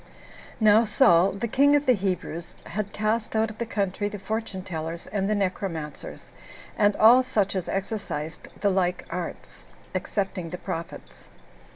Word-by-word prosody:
2. 220 - 0
Now 215 +2 +7
Saul, 190 -4 +4
the 200 +4 -3
king 280 +5 +4
of 290 0 +2
the 255 - +5
Hebrews, 185 -4 -3
had 205 -1 -4
cast 220 +1 -1
out 220 0 +2
of 215 - -14
the 235 - -2
country 205 -1 -1
the 205 - -6
fortune 215 -2 -4
tellers, 165 -2 -5
and 200 -1 -2
the 215 - +2
necromancers, 180 -6 -4 0.4
and 205 -1 +3
all 235 +4 +7
such 210 -7 0
as 185 -2 -2
exercised 190 -6 -4
the 200 - +3
like 185 -1 0
arts, - - -6 0.3
excepting 190 -4 -2
the 180 - -5
prophets. 165 -1 -7
200 Hz, 160 wpm, -26 LUFS, 180-220 Hz, 0.4 s, Now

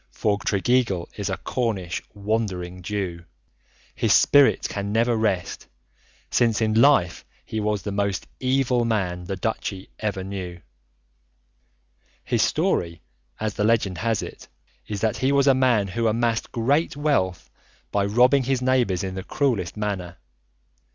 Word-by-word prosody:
For 100 -1 0
Tregeagle 100 -4 +1
is 100 -1 -3
a 95 - -2
Cornish 100 -5 -2
"Wandering 100 -4 -2
Jew"; 90 -3 -4 0.7
his - - +2
spirit 145 -1 +5
can 100 0 -4
never 115 +2 +2
rest, 100 -5 -1 0.6
since 115 -3 +2
in 110 -1 +1
life 135 - +4 0.2
he 110 - -4
was 105 -2 -1
the 100 - -3
most 100 -1 -1
evil 130 -2 +1
man 95 -6 -1
the 95 - -3
Duchy 95 -1 -4
ever 100 -3 -2
knew. 95 -2 -6 1.6
His - - 0
story, 85 -2 0 0.4
as 110 -1 -2
the 105 - -1
legend 105 -5 +1
has 115 +1 0
it, - - -9 0.4
is 105 -2 -4
that 110 -1 0
he 130 +2 +1
was 140 -1 +3
a 135 - +6
man 125 -6 +2
who 115 +5 0
amassed 115 +1 0
great 140 +7 +1
wealth 95 - 0 0.4
by 100 - +1
robbing 125 +6 +4
his 135 0 +1
neighbours 125 -8 +1
in 95 -1 -3
the 95 0 -5
cruellest 110 - -1
manner. 95 -4 -3
105 Hz, 145 wpm, -24 LUFS, 95-120 Hz, 1.6 s, a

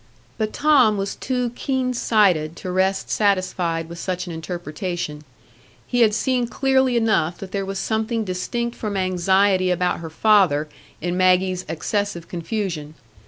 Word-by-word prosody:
But 215 -1 0
Tom 270 -8 +4
was 195 0 -3
too 250 -2 -2
keen 255 0 -1
sighted 185 -10 +2
to 185 - -6
rest 190 +1 0
satisfied 185 -5 0
with 170 0 -9
such 180 0 -3
an 175 - -7
interpretation; 165 -2 -5 0.6
he 245 - -1
had 215 -2 +4
seen 250 0 +1
clearly 265 0 +2
enough 215 -7 +1
that 190 -1 -9
there 195 -1 -2
was 195 0 -4
something 220 +3 -1
distinct 235 +6 -3
from 210 -3 -3
anxiety 185 +1 +2
about 180 0 0
her 165 -1 -7
father 175 -5 +3 0.3
in 175 +2 -2
Maggie's 185 0 +2
excessive 175 +1 -2
confusion. 170 -4 -4
190 Hz, 145 wpm, -22 LUFS, 175-220 Hz, 0.6 s, Tom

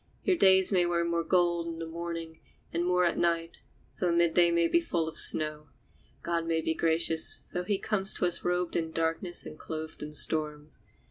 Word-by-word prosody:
Your 375 - +2
days 190 - +4
may 185 -2 +3
wear 170 -1 0
more 170 0 -1
gold 170 -1 +1
in 165 -1 -6
the 165 - -6
morning, 165 0 -7 0.3
and 170 +1 -1
more 180 0 +1
at 170 - -1
night, 165 -1 -1 0.4
though 180 - 0
the - - +1
midday 170 0 +3 0.2
be 340 - +2
full 170 - -2
of 160 - -7
snow. 155 -1 +4 0.6
God 170 -1 -2
may 165 -1 0
be 160 0 -1
gracious, 160 0 +1
though 180 0 -3
he 200 +1 0
comes 195 -1 0
to - - 0
us 175 -1 +1
robed 180 0 -1
in 165 -1 -2
darkness 165 +2 -2
and 155 - -10
clothed 160 0 -7
in 150 0 -7
storms. 150 -1 -1
170 Hz, 195 wpm, -28 LUFS, 160-175 Hz, 0.6 s, days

